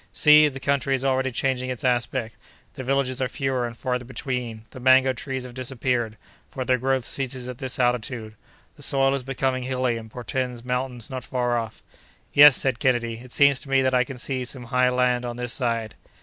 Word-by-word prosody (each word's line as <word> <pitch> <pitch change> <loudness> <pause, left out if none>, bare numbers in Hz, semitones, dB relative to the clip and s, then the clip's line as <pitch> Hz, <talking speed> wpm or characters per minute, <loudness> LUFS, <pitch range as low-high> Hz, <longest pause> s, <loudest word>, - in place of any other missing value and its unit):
See! 150 0 +7
the 135 -2 -5
country 140 0 +1
is 130 +1 -3
already 130 0 +1
changing 130 0 -1
its 125 -2 -5
aspect: 120 -3 0 0.4
the 130 - -7
villages 130 0 0
are 130 - +1
fewer 130 -2 -1
and 115 -1 -10
farther 125 -1 -2
between; 125 -3 -5
the - - -10
mango 130 +1 +5
trees 130 0 -4
have 125 -1 -9
disappeared, 125 -3 -2 0.3
for 130 -2 -5
their 130 0 +2
growth 130 0 0
ceases 130 -2 -3
at 125 -1 -7
this 130 -2 -1
latitude. 120 -2 -1 0.4
The - - -15
soil 135 0 +3
is 140 - -1
becoming 130 0 -1
hilly 125 -2 -1
and 110 -1 -9
portends 125 0 -4
mountains 125 -2 -3
not 130 -1 -5
far 120 -1 -1
off." 115 -2 -4 0.5
"Yes," 145 -1 +9
said 130 -3 -1
Kennedy, 120 -3 0
"it 125 - -14
seems 140 -1 +4
to 140 - -10
me 135 -1 +3
that 130 0 +1
I 125 0 +4
can 130 +1 -9
see 130 +1 -3
some 125 0 -6
high 125 0 +4
land 125 -1 +1
on 120 -1 -5
this 125 -1 -3
side." 115 -4 -2
125 Hz, 205 wpm, -24 LUFS, 120-130 Hz, 0.5 s, Yes